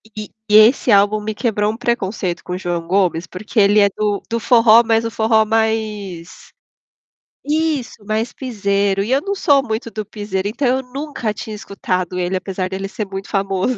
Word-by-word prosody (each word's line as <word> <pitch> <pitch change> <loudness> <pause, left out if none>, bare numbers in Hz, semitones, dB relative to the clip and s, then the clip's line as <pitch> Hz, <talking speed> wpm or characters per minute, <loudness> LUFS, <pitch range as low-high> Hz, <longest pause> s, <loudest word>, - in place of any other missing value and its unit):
E 210 -1 -6 0.2
e 210 - +4
esse 220 +1 +6
álbum 205 +2 +4
me 215 0 -4
quebrou 210 -3 0
um - - -9
preconceito 195 -7 -2
com 180 - -6
o - - -2
João 175 -2 -3
Gomes, 180 -2 +1
porque 215 +4 -3
ele 205 +1 +5
é 200 - +4
do 210 -1 0
do 230 - 0
forró 230 -1 +6
mas 225 0 +2
o 230 - -3
forró 220 0 +3
mais 215 -5 -2 1.2
isso 300 -8 -1
mais 220 +3 -2
pisero 200 -5 -1
e 220 +5 -3
eu 275 +2 +3
não 400 +1 -3
sou 285 -8 +3
muito 220 +1 -3
do 215 -1 -5
pisero, 205 -2 -4
então, 250 +4 -1
eu 260 +1 +1
nunca 275 -6 -4
tinha 215 0 -7
escutado 185 -3 -3
ele 180 +1 -1
apesar 185 0 -3
dele 195 +1 -5
ser 210 +1 -4
muito 195 0 -7
famoso. 195 +4 -1
215 Hz, 185 wpm, -18 LUFS, 195-230 Hz, 1.2 s, esse